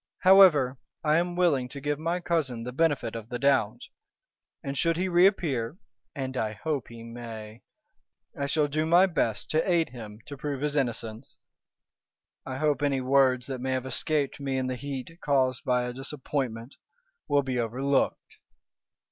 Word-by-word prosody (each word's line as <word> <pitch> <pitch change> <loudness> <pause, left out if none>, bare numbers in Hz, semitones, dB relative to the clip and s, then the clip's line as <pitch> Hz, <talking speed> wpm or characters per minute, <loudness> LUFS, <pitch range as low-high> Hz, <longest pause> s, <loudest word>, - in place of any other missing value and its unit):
However, 170 -10 +6 0.2
I 155 0 +3
am 175 +1 0
willing 150 -8 +2
to 140 - -7
give 145 +1 -2
my 170 +3 -1
cousin 150 -9 -1
the 125 - -5
benefit 140 -5 0
of 115 0 -7
the 120 - -3
doubt, 130 -6 +2 0.8
and 135 0 -4
should 165 +4 +1
he 185 +2 0
reappear 175 - +2 0.4
(and 130 -2 -4
I 110 -3 -1
hope 140 +3 -3
he 115 -1 -11
may) 115 -1 -9 0.7
I 140 -3 -2
shall 150 0 +2
do 155 +2 -1
my 175 +3 +6
best 160 - -1
to 160 +4 +1
aid 165 -4 +2
him 110 -4 -10
to 145 - -8
prove 140 0 -4
his 150 0 -1
innocence. 120 -2 -3 1.1
I 130 -1 -4
hope 145 -2 +1
any 140 -2 +1
words 130 -1 +3
that 130 -2 -5
may 130 0 -1
have 130 0 -2
escaped 145 +1 -1
me 135 -1 -2
in 130 - -1
the 130 0 -2
heat 140 +5 -6
caused 130 -3 +1
by 125 -1 +2
a 125 0 -4
disappointment 130 -2 -4 0.5
will 145 -1 +3
be 130 -2 -2
overlooked." 130 +4 -1
135 Hz, 165 wpm, -27 LUFS, 125-150 Hz, 1.1 s, However